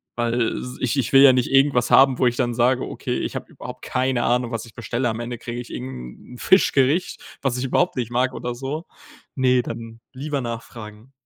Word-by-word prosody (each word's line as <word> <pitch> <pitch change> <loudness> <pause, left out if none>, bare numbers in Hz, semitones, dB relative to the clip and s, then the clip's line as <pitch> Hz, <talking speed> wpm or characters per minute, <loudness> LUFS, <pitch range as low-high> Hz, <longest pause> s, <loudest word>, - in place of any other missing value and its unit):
weil 120 -1 0
s 125 0 -7
ich 130 +1 0
ich 130 -5 0
will 135 0 +7
ja 130 -2 +8
nicht 125 0 0
irgendwas 135 -3 +3
haben, 135 -1 +6
wo 130 - +4
ich 120 - 0
dann 120 -2 0
sage: 125 +2 +2
„Okay, - - -4
ich - - -4
habe - - -6
überhaupt - - -9
keine 130 -1 0
Ahnung, 120 0 +1
was 115 0 -4
ich 115 - -17
bestelle.“ 120 +1 -2
Am 110 +1 -4
Ende 120 0 -5
kriege 120 0 -6
ich 120 - -8
irgend 60 - -7
’n - - -15
'n - - -11
Fischgericht, 155 -2 +2 0.2
was 135 -3 -1
ich 125 - -2
überhaupt 175 +7 +1
nicht 120 -2 -2
mag 125 +2 +1
oder 125 0 -4
so. 140 +6 -5 0.5
Ne, 130 -1 +3
dann 115 -1 -7
lieber 140 +2 -3
nachfragen. 115 -1 -8
125 Hz, 220 wpm, -22 LUFS, 120-130 Hz, 0.5 s, ja